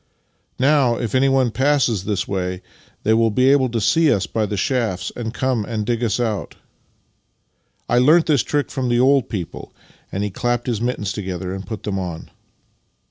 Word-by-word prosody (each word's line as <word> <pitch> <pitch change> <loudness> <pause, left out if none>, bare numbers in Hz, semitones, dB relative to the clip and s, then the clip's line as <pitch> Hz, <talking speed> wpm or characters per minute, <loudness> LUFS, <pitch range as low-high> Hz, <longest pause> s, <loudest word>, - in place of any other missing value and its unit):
" - - -43
Now, 135 -3 +3
if 120 -3 -3
anyone 130 -2 +3
passes 130 -7 +1
this 100 -3 -1
way 90 -1 -3 0.4
they 110 - +3
will 115 0 +3
be 130 +5 +3
able 135 -2 +3
to 115 0 -1
see 150 +9 +3
us 95 -2 +1
by 110 +3 -1
the 105 - -3
shafts, 110 -6 -1
and 115 -2 -4
come 130 -2 -1
and 110 -1 -3
dig 120 +1 -1
us 115 +1 0
out. 110 -4 -2 1.3
I 120 - +3
learnt 155 +6 +5
that 150 -4 +3
trick 145 +7 -1
from 130 -3 -2
the 120 0 +2
old 130 0 +3
people," 95 -7 -6 0.4
and 100 - -2
he 105 - -2
clapped 120 +4 -1
his 115 -4 -2
mittens 110 -5 -2
together 95 -2 -4
and 95 0 -7
put 110 -2 -6
them 100 -2 -2
on. 85 -3 -6
115 Hz, 190 wpm, -20 LUFS, 100-130 Hz, 1.3 s, learnt